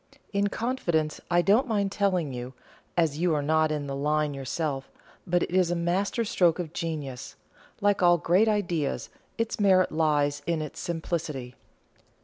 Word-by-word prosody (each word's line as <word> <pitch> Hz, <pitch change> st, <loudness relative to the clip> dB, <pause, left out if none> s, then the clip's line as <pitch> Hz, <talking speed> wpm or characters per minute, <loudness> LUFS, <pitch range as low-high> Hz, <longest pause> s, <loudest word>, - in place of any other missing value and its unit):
"In 200 Hz, 0 st, +2 dB
confidence, 180 Hz, -10 st, -1 dB
I 175 Hz, 0 st, +3 dB
don't 220 Hz, +8 st, +4 dB
mind 200 Hz, -4 st, 0 dB
telling 185 Hz, -8 st, 0 dB
you, 125 Hz, +1 st, -6 dB, 0.4 s
as 160 Hz, -3 st, +2 dB
you 170 Hz, -2 st, +2 dB
are 145 Hz, -, 0 dB
not 155 Hz, +1 st, +2 dB
in 150 Hz, -2 st, -2 dB
the 140 Hz, -1 st, -4 dB
line 150 Hz, +1 st, 0 dB
yourself; 135 Hz, 0 st, -3 dB, 0.4 s
but 175 Hz, 0 st, +2 dB
it -, -, -4 dB
is 185 Hz, -1 st, +3 dB
a 175 Hz, -, 0 dB
master 190 Hz, +7 st, 0 dB
stroke 175 Hz, -5 st, +3 dB
of 170 Hz, -3 st, -5 dB
genius. 145 Hz, -6 st, -5 dB, 0.5 s
Like 205 Hz, -1 st, +2 dB
all 175 Hz, -1 st, +6 dB
great 180 Hz, +7 st, +3 dB
ideas, 175 Hz, -9 st, -1 dB, 0.3 s
its 230 Hz, -1 st, -2 dB
merit 190 Hz, -2 st, +4 dB
lies 145 Hz, -2 st, +1 dB
in 170 Hz, -2 st, +1 dB
its 155 Hz, -2 st, -6 dB
simplicity." 160 Hz, -6 st, -3 dB
170 Hz, 160 wpm, -27 LUFS, 150-185 Hz, 0.5 s, all